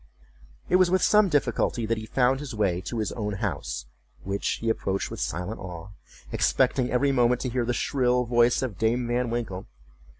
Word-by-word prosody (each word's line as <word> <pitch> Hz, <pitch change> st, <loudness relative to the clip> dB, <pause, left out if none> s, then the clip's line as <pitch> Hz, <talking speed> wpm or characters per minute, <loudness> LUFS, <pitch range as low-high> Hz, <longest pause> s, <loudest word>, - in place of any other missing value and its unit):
It 180 Hz, -, +4 dB
was 185 Hz, -1 st, +4 dB
with 185 Hz, 0 st, +2 dB
some 210 Hz, -2 st, +5 dB
difficulty 125 Hz, -5 st, 0 dB
that 115 Hz, 0 st, -1 dB
he 110 Hz, -, -8 dB
found 130 Hz, +2 st, +2 dB
the 135 Hz, -6 st, -7 dB
way 95 Hz, -4 st, +1 dB
to 120 Hz, -, -4 dB
his 110 Hz, -2 st, -1 dB
own 105 Hz, -3 st, -3 dB
house, 95 Hz, -, -3 dB, 0.4 s
which 100 Hz, +1 st, -1 dB
he 115 Hz, -, -5 dB
approached 100 Hz, -3 st, -1 dB
with -, -, -6 dB
silent 90 Hz, +7 st, -3 dB
awe, 90 Hz, -1 st, -8 dB, 0.4 s
expecting 125 Hz, -1 st, +2 dB
every 140 Hz, +3 st, +2 dB
moment 125 Hz, -1 st, +2 dB
to 130 Hz, -, -2 dB
hear 120 Hz, 0 st, -1 dB
the 120 Hz, -, 0 dB
shrill 125 Hz, -2 st, +1 dB
voice 120 Hz, +1 st, +3 dB
of 110 Hz, -9 st, -4 dB
Dame 120 Hz, +2 st, +1 dB
Van 120 Hz, 0 st, 0 dB
Winkle. 115 Hz, -6 st, -4 dB
120 Hz, 190 wpm, -26 LUFS, 105-125 Hz, 0.4 s, some